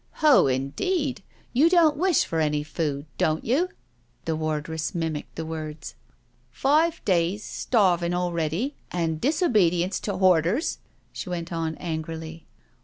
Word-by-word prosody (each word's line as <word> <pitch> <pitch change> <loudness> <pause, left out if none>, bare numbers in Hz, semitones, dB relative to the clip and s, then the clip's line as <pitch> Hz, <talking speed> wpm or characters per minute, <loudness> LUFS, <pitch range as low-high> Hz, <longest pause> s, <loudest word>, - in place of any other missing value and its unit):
" - - -38
Ho, 290 - +7
indeed— 240 - -1 0.3
you 290 +7 +5
don't 335 -4 +5
wish 355 +2 +2
for 165 - -2
any 150 -1 +1
food, 150 -2 -3
don't 155 0 +1
you?" 295 +11 +2 0.6
The 160 - 0
wardress 155 +1 -3
mimicked 160 -3 -3
the 165 - -4
words. 155 -1 -6 0.6
"Five 315 +4 +1
days 185 +2 +1
starving 175 -6 +1
already 175 - -1 0.2
and 165 -3 -2
disobedience 200 - +2
to 200 -3 -3
borders," 185 - +2 0.3
she - - -6
went 170 -1 -4
on 165 -1 -2
angrily. 160 -1 -6
170 Hz, 130 wpm, -25 LUFS, 160-240 Hz, 0.6 s, Ho